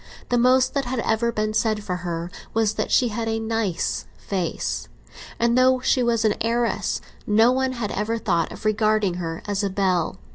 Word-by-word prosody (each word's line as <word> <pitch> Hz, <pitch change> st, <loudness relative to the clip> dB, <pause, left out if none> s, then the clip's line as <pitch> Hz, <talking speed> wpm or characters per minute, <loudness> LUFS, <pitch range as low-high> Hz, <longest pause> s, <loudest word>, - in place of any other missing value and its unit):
The 245 Hz, -, +2 dB
most 255 Hz, +1 st, +4 dB
that 275 Hz, -2 st, 0 dB
had 255 Hz, +1 st, -3 dB
ever 230 Hz, +1 st, +1 dB
been 215 Hz, -1 st, -1 dB
said 215 Hz, -1 st, +1 dB
for 180 Hz, -3 st, -2 dB
her 170 Hz, -1 st, -4 dB, 0.2 s
was 220 Hz, -1 st, +2 dB
that -, -, -2 dB
she 245 Hz, -, +3 dB
had 225 Hz, +1 st, -3 dB
a 225 Hz, 0 st, 0 dB
"nice" 225 Hz, -5 st, -1 dB
face, 185 Hz, -5 st, -3 dB, 0.5 s
and, 235 Hz, 0 st, +2 dB
though 255 Hz, 0 st, +4 dB
she 255 Hz, 0 st, +2 dB
was 230 Hz, -2 st, +1 dB
an 215 Hz, -, +4 dB
heiress, 235 Hz, +1 st, 0 dB, 0.3 s
no 220 Hz, +3 st, +5 dB
one 260 Hz, 0 st, 0 dB
had 235 Hz, -4 st, -3 dB
ever 220 Hz, +3 st, -1 dB
thought 170 Hz, -6 st, 0 dB
of -, -, -10 dB
regarding 215 Hz, -3 st, +2 dB
her 165 Hz, -1 st, -5 dB
as 205 Hz, 0 st, -1 dB
a 200 Hz, -, +1 dB
belle. 185 Hz, -3 st, 0 dB
220 Hz, 190 wpm, -23 LUFS, 200-235 Hz, 0.5 s, no